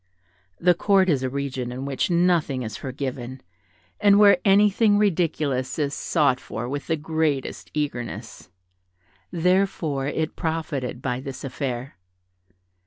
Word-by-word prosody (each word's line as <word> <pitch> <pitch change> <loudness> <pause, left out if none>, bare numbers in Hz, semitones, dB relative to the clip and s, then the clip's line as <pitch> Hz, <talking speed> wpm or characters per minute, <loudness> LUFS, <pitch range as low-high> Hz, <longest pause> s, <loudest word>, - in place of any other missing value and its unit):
The 180 +1 +5
Court 190 +1 +3
is 140 -5 +2
a 130 - -1
region 130 -2 -3
in 130 +2 -5
which 140 +4 -1
nothing 170 -7 +2
is 110 -2 -5
forgiven, 130 -1 -5 0.6
and 205 -1 +5
where 205 +4 +6
anything 205 +1 +4
ridiculous 155 -9 0
is 145 -2 -1
sought 140 -6 +1
for 110 0 -6
with 140 +2 -4
the 160 - +1
greatest 155 -3 -2
eagerness; 120 -9 -4 0.8
therefore, 170 -5 0
it 155 +2 -2
profited 145 -6 -3
by 125 -2 -1
this 135 -1 -7
affair. 130 -2 -4
145 Hz, 125 wpm, -24 LUFS, 130-175 Hz, 0.8 s, where